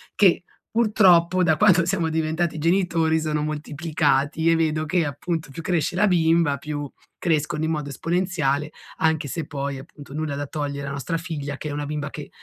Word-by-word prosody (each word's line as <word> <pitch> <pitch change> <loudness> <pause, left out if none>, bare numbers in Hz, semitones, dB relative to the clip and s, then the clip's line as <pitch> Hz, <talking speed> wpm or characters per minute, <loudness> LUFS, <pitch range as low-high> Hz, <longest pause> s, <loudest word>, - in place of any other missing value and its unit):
che 185 -3 +4 0.3
purtroppo 185 -6 +4
da 160 -4 +3
quanto 185 -4 +5
siamo 170 -3 0
diventati 160 +1 -1
genitori 165 -1 +2
sono 155 -1 -1
moltiplicati. 150 0 0
E 165 - +5
vedo 155 -1 0
che, 170 +1 +1
appunto, 155 +3 -3
più 150 - -7
cresce 170 -1 0
la 210 +3 +3
bimba 165 -4 +3
più 145 0 -5 0.3
crescono 155 -2 0
in 160 - 0
modo 150 -2 -3
esponenziale, 155 -2 -1 0.3
anche 160 -2 +1
se 160 +3 -4
poi 140 -3 -4
appunto 140 +1 -12
nulla 155 -1 -2
da 145 +1 -3
togliere 140 -1 -4
a - - -4
nostra 140 +4 -2
figlia 150 -5 -5
che 150 - -5
è - - -4
una 145 0 -3
bimba 150 -1 -3
che 150 -2 -8
155 Hz, 180 wpm, -23 LUFS, 145-170 Hz, 0.3 s, quanto